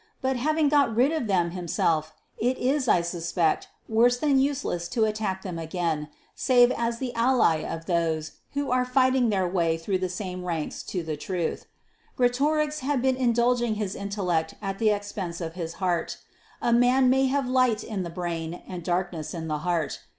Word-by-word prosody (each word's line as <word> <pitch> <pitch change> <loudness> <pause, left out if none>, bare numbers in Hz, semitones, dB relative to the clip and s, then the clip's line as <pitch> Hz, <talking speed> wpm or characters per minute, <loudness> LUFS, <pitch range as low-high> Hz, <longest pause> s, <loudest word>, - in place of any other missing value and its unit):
But 265 -1 0
having 305 +4 +1
got 280 -6 +3
rid 255 +6 +4
of 315 -8 -1
them 180 -4 +2
for 170 - -9
himself, 160 -2 0 0.3
it 250 +3 +1
is, 265 +1 0
I 175 - +4
suspect, 170 -1 0 0.2
worse 240 +2 +4
than 275 0 +3
useless 265 -11 -1
to 225 -3 +1
attack 210 -3 -2
them 180 -4 -5
again, 160 -2 -2 0.3
save 245 -1 +4
as 235 -1 -1
the 250 0 -4
ally 230 -8 +3
of 160 +1 -5
those 165 -3 0 0.2
who 285 -2 -2
are 250 0 +3
fighting 255 -1 +3
their 190 -3 +1
way 170 -3 +1
through 185 +3 -1
the 185 0 -1
same 180 0 -5
ranks 165 -4 -3
to 180 -3 -2
the 155 -2 -4
truth. 175 +1 -3 0.5
Greatorex 295 +5 +1
had 270 -2 -1
been 260 -1 +3
indulging 240 -2 +2
his 205 -3 -3
intellect 180 -5 -2
at 195 -2 -4
the 220 -2 +3
expense 205 -4 -3
of 165 -2 -5
his 170 -2 -5
heart. 175 -3 -1 0.5
A 235 - +3
man 250 +2 +4
may 265 +1 +3
have 275 0 0
light 255 -4 +2
in 210 -4 -4
the 175 - -4
brain 170 -1 -4
and 180 -2 -6
darkness 175 -3 -2
in 160 -1 -5
the 150 -1 -1
heart. 170 -1 -1
205 Hz, 185 wpm, -26 LUFS, 170-250 Hz, 0.5 s, rid